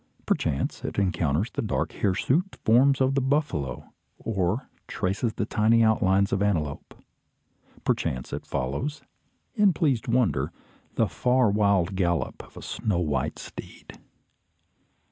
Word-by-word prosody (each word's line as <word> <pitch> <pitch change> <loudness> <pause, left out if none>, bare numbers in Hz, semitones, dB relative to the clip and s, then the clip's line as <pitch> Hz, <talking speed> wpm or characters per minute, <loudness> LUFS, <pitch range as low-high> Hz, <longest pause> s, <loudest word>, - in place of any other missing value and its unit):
Perchance 70 -3 -1
it - - -4
encounters 90 - 0
the - - -3
dark 105 - -1
hirsute 135 - 0
forms 135 +5 +5
of 130 +1 +3
the 135 - +1
buffalo, 130 - -1 0.2
or 100 +3 -1 0.2
traces 100 +5 -1
the 105 - -2
tiny 115 +1 +3
outlines 100 -3 +3
of 100 - +2
the 100 - +2
antelope. 75 -8 -2 0.9
Perchance 65 -1 -1
it - - -5
follows, 70 - -3 0.5
in 205 -6 +4
pleased 140 -6 0
wonder, 110 - +1 0.4
the - - +2
far 125 -3 +2
wild 100 -3 +2
gallop 85 -3 0
of - - -17
a - - -9
snow 105 -5 -2
white 80 -4 -1
steed. - - -10
105 Hz, 130 wpm, -26 LUFS, 85-125 Hz, 0.9 s, forms